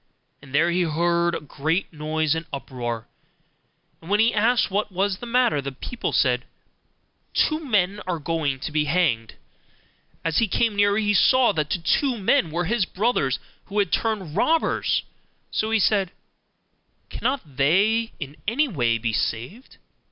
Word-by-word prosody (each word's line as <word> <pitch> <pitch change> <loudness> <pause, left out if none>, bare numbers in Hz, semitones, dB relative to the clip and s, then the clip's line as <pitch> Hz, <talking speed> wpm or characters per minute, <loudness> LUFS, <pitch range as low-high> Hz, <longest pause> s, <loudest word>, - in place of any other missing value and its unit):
And 140 -1 -15
there 170 +3 +3
he 180 +1 +1
heard 170 +1 +1
a - - -2
great 155 +5 -2
noise 155 0 0
and 160 +1 -4
uproar; 120 -4 -5 0.9
and 165 - -12
when 205 +1 +2
he 225 +2 +4
asked 225 0 +2
what 205 +1 -1
was 190 +1 -1
the 240 - -7
matter, 235 - +2
the 140 0 -5
people 230 - -5
said, 125 -2 +2 0.9
'Two 310 0 +2
men 205 -6 +1
are 180 -2 -1
going 150 -3 -2
to - - -4
be 150 0 +1
hanged.' 140 -9 0 0.9
As 165 -1 +2
he 230 - +2
came 225 +2 +1
nearer, 205 0 +3
he 210 -1 +1
saw 255 +4 +5
that 155 -5 -2
the - - 0
two 240 - +1
men 190 -4 +2
were 170 +2 -2
his 220 +3 +1
brothers, 180 - 0 0.3
who 200 - -6
had 200 -4 +2
turned 200 -9 -1
robbers; 320 +10 +1 0.5
so 215 - -1
he 225 - +3
said, 200 -2 +2 1.0
'Cannot 180 - -3
they 205 +11 +3
in 145 -1 -7
any 280 +8 +2
way 120 - +1
be 115 -1 -2
saved? 125 - -3
180 Hz, 160 wpm, -24 LUFS, 150-215 Hz, 1.0 s, saw